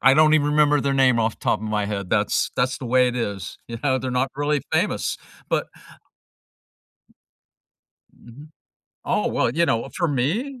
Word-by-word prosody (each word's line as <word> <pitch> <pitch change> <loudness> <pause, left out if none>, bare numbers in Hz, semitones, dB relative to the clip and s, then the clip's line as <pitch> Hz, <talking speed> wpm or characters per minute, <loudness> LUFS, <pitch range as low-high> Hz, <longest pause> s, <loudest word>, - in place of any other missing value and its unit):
I 135 0 +6
don't 155 +1 +5
even 145 -2 +3
remember 150 -1 +3
their 140 -1 0
name 130 -3 +4
off 115 -1 -1
the - - -15
top - - +2
of 110 - -5
my 105 -1 0
head, 100 -2 -4
that's - - +1
that's 125 +1 0
the 130 - -6
way 125 +1 +3
it 125 - -4
is, 100 -5 -4
yeah, 130 +3 -1
they're 130 +1 -4
not 125 +1 0
really 145 -1 0
famous, - - 0 0.3
but - - 0 2.5
Mhm. 140 +6 -14 0.6
Oh, - - 0
well, - - 0
you 170 +7 +1
know, 115 0 0
for 175 - +1
me, 200 - -1
130 Hz, 175 wpm, -23 LUFS, 115-150 Hz, 2.5 s, I